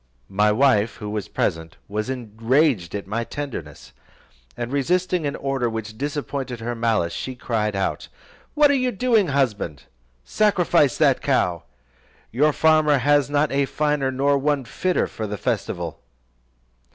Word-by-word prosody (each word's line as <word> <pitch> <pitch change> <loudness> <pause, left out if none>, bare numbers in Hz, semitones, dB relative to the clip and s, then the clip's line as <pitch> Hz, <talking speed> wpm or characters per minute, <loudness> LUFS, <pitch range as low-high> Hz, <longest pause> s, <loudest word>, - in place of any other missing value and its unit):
My 105 +2 +3
wife, 110 -2 +3
who 105 -2 -6
was 105 -3 -3
present, 80 0 -2
was 105 +4 -3
enraged 120 - 0
at 100 - -4
my 110 +4 -2
tenderness, 115 - -7 0.6
and 120 +1 -4
resisting 175 +3 0
an 140 - -3
order 135 -3 -1
which 110 -1 -5
disappointed 140 -2 -4
her 120 +1 -3
malice, 115 -7 0
she 130 - -5
cried 110 -4 -2
out, 95 - -2 0.5
"What 295 -1 +5
are - - +3
you 255 -2 +1
doing, 225 -3 +2
husband? 110 - -1 0.4
Sacrifice 175 - +2
that 140 -4 +3
cow; 90 - 0 0.7
your 150 +6 +3
farmer 155 -1 +4
has 145 +1 +3
not 145 +1 +1
a 140 0 +2
finer, 150 -1 0
nor 140 +2 +1
one 140 -1 0
fitter 185 +8 0
for 110 - -5
the 105 0 -4
festival." - - -3
130 Hz, 145 wpm, -23 LUFS, 110-145 Hz, 0.7 s, What